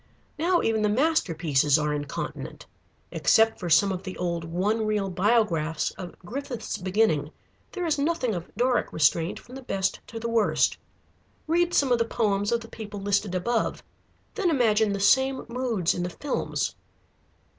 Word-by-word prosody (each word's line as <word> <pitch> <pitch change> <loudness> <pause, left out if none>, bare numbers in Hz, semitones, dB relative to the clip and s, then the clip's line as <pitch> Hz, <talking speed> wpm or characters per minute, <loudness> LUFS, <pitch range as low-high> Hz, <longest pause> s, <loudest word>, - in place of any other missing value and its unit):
Now 350 +2 +2
even 225 -1 +1
the 210 - +2
masterpieces 165 - +2
are 150 -1 0
incontinent. 145 -1 -5 0.5
Except 225 0 +3
for 175 - -4
some 195 +5 +5
of 185 -1 -3
the 185 -1 -7
old 170 -2 -2
one 190 +7 0
reel 205 -3 0
Biographs 180 -6 +1
of 180 -2 -9
Griffith's 245 +1 -5
beginning, 180 -6 +1 0.4
there 360 -2 -3
is 305 -3 0
nothing 280 -6 0
of 175 -2 -5
Doric 250 +1 +1
restraint 160 +3 +2
from 250 - -15
the 270 - -7
best 195 -6 -1
to 230 - -7
the 230 - -3
worst. 230 -2 +2 0.7
Read 345 +2 +1
some 275 -3 +3
of 240 - +3
the 230 - +2
poems 205 -3 0
of 235 0 +1
the 230 - -10
people 210 -3 -8
listed 200 -1 0
above, 225 +6 -1 0.5
then 400 -5 0
imagine 220 -7 +3
the 200 - -2
same 265 +6 +3
moods 235 -7 0
in 175 - -3
the 175 - -2
films. 285 +9 -2
215 Hz, 165 wpm, -26 LUFS, 180-245 Hz, 0.7 s, some